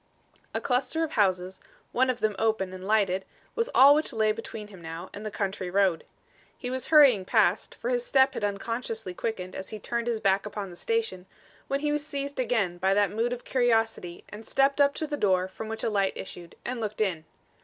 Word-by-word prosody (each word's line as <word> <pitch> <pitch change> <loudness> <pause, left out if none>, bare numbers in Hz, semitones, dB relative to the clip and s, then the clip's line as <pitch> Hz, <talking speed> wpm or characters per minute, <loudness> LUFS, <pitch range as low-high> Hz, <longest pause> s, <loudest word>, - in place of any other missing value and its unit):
A - - +1
cluster 275 +6 0
of 315 - -2
houses, 185 - 0 0.3
one 260 +1 +2
of 250 -1 -1
them 215 -1 +1
open 215 -4 0
and 185 +1 -8
lighted, 195 -3 +2 0.3
was 465 +1 -1
all 275 +2 +9
which 305 +2 +1
lay 220 -3 +2
between 215 -1 -7
him 190 -4 -13
now 165 +2 -7
and 205 - -7
the 215 - -3
country 195 -3 -3
road. 190 -3 +2 0.5
He 250 - -5
was 260 0 -3
hurrying 280 -11 +6
past, - - +2
for - - -3
his - - 0
step 270 - +3
had - - -5
unconsciously 220 0 -3
quickened 185 -2 -4
as 190 - -6
he 215 - -6
turned 235 +3 -3
his 230 -2 0
back 200 -1 +2
upon 205 -2 -5
the - - -10
station, 450 - -2 0.4
when 275 +1 -1
he 300 -1 0
was 295 0 0
seized 280 -2 -4
again 215 -8 0
by 190 +2 +2
that 205 -1 +3
mood 230 +3 0
of 245 0 -5
curiosity 225 -8 0
and 215 +2 -10
stepped 275 +1 +2
up 280 0 +4
to 315 - -2
the 295 -1 -3
door 185 -4 +2
from 215 +3 -8
which 225 0 -4
a - - +1
light 195 -2 +1
issued 175 -3 -9
and 245 -1 -3
looked 215 -1 -4
in. 180 -7 0
220 Hz, 215 wpm, -27 LUFS, 190-260 Hz, 0.5 s, all